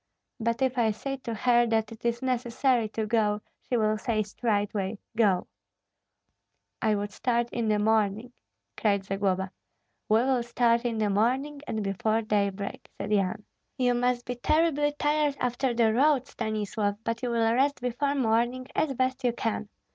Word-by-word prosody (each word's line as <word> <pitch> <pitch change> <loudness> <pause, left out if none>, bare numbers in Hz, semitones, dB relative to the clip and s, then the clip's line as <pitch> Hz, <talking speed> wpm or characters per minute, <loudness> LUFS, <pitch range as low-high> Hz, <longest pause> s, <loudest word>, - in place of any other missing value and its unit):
But 230 +3 0
if 260 -1 +1
I 225 -2 +3
say 270 +6 -3
to 235 -3 -5
her 240 +1 +3
that 220 -1 0
it 225 - -11
is 235 +1 -1
necessary 245 -2 +1
to 220 0 -2
go, 210 -1 +1 0.2
she 245 - -1
will 215 -1 +1
say 215 -1 0
straightway. 205 -1 -1 0.2
Go!" 200 -5 +3 1.4
"I 215 -1 +2
would 205 0 -3
start 235 +1 0
in 235 -2 -1
the 210 -1 +3
morning," 220 +2 +1 0.4
cried 200 -2 +1
Zagloba. 190 -1 -1 0.6
"We 220 +2 +5
will 260 -1 +2
start 235 0 +1
in 235 -2 -1
the 210 -2 +1
morning 260 +8 0
and 220 -1 -2
before 215 +3 0
daybreak," 200 -2 -2
said - - -4
Yan. 200 0 0 0.3
"You 250 -2 +2
must 245 0 0
be 245 - -2
terribly 295 +3 +2
tired 295 -1 +1
after 250 +1 0
the 230 -2 +3
road, 270 +1 +3
Stanislav, 215 -3 -2
but 230 0 -2
you 250 - -1
will 230 -1 +2
rest 275 +3 +2
before 255 +4 -1
morning 240 0 +1
as 280 -4 +1
best 260 +1 0
you 245 -2 +2
can. 220 -3 -2
230 Hz, 165 wpm, -27 LUFS, 215-250 Hz, 1.4 s, We